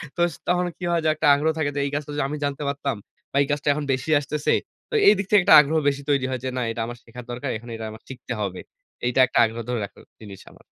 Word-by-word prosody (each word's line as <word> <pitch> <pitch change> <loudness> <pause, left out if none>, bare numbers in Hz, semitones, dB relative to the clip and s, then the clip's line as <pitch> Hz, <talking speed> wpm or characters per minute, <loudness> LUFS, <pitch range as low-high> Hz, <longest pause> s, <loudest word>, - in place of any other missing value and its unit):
তো 175 - -2
স - - -10
তখন 180 0 +2
কি - - -10
হয় 170 -1 +1
যে - - +4
একটা 155 0 0
আগ্রহ 155 +3 +1
থাকে 155 -2 0
যে - - -1
এই 140 - -3
কাজটা 145 0 -4
যদি 145 - 0
আমি 150 - -3
জানতে 140 +1 -3
পারতাম 140 -2 -2 0.4
বা - - -11
এই - - -5
কাজটা 145 0 -2
এখন 150 0 -3
বেশি 130 +3 -4
আসতেছে। 145 +1 -1 0.4
তো - - -12
এইদিক 200 -1 +5
থেকে 210 -2 +6
একটা 200 - +7
আগ্রহ 150 +2 -1
বেশি 140 0 -4
তৈরি 140 -2 +2
হয় 130 -1 -2
যে 130 - -2
না - - 0
এটা 115 - -4
আমার 120 +1 -7
শেখার 120 +1 -11
দরকার, 125 +3 -4
এখানে 120 +2 -11
এটা 110 0 -6
আমার 110 - -12
শিখতে 130 -1 -6
হবে। 95 -3 -3 0.5
এইটা 125 +2 +1
একটা 130 - 0
আগ্রহ 115 +1 -4
ধরে 125 -1 -1
রাখার - - -15 0.2
জিনিস 100 -3 -10
আমার। - - -19
140 Hz, 270 wpm, -23 LUFS, 120-150 Hz, 0.5 s, একটা